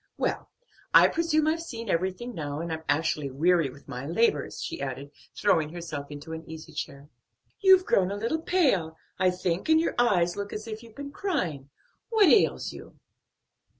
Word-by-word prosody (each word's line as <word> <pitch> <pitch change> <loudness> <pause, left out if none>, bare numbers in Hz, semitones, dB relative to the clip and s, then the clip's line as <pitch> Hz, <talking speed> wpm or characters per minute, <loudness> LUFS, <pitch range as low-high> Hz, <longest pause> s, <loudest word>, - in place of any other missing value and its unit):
Well, - - -2 0.5
I - - +9
presume 320 -2 +1
I've 320 +2 +1
seen 230 -8 -7
everything 190 +7 -1
now, 145 -5 -4
and 165 0 -3
I'm 160 - -5
actually 150 -2 +1
weary 165 +2 +2
with 140 +2 -15
my 125 -2 -6
labors," 170 -4 +1
she - - -5
added, 140 +1 -5 0.2
throwing 170 -7 +2
herself 160 -4 -6
into 150 +2 -8
an 160 0 -6
easy 160 -1 -9
chair. 140 +1 -6 0.5
"You've 380 -2 +6
grown 185 -1 +2
a 200 - -3
little 235 +10 -1
pale, 225 - +1 0.2
I 185 0 +4
think, 180 - -2
and 315 0 +6
your 330 - 0
eyes 180 -8 +3
look 200 0 -5
as 215 - -5
if 220 0 -6
you'd 230 -2 -15
been 285 0 -7
crying. 180 - -2 0.4
What 430 -6 +5
ails 415 - +3
you?" - - -12
180 Hz, 180 wpm, -27 LUFS, 155-245 Hz, 0.5 s, I